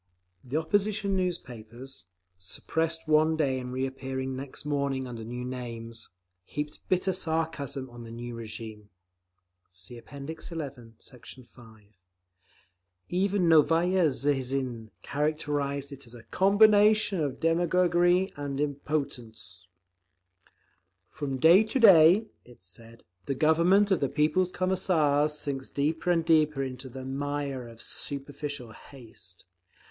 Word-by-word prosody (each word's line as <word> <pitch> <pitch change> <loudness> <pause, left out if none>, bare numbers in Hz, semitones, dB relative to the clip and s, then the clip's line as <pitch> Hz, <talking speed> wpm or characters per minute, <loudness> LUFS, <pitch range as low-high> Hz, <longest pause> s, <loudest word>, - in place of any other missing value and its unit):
The 130 +4 -3
opposition 200 +4 0
newspapers, 125 - -5 0.3
suppressed 165 - -3
one 155 +1 +3
day 135 -4 +1
and 125 0 -6
reappearing 130 0 -3
next 135 +2 -7
morning 140 -2 -1
under 115 -2 -7
new 125 +2 -6
names, 115 -2 -7 0.3
heaped 150 +8 -5
bitter 185 0 +1
sarcasm 160 -6 -2
on 120 -1 -12
the 115 - -10
new 120 +1 -7
regime. 110 -2 -8 0.8
(See 95 +7 -9
App. - - -20
XI, 160 +4 -7 0.4
Sect. 125 -3 -12
5) 115 -3 -17 1.3
Even 190 0 +1
Novaya 165 +3 +4
Zhizn 130 -4 -2
characterised 145 -1 -2
it 140 -2 -10
as 120 - -10
"a 115 - -12
combination 210 - +4
of 145 -4 -2
demagoguery 175 +2 +2
and 140 -1 -4
impotence." 130 - -4 1.4
From 135 +4 -5
day 170 +9 +7
to 260 - -1
day 190 -1 +7 0.2
(it 120 -7 -18
said) 115 +6 -12 0.2
the 140 - -1
Government 170 +8 +4
of 190 - +3
the 140 - 0
People's 155 +5 +1
Commissars 155 -6 +1
sinks 135 -2 -4
deeper 155 +5 -1
and 165 -2 +2
deeper 155 -4 +3
into 130 0 -6
the 130 +1 -8
mire 140 -1 -3
of 115 -1 -10
superficial 140 -3 -4
haste. 110 -9 -14
145 Hz, 120 wpm, -28 LUFS, 125-165 Hz, 1.4 s, day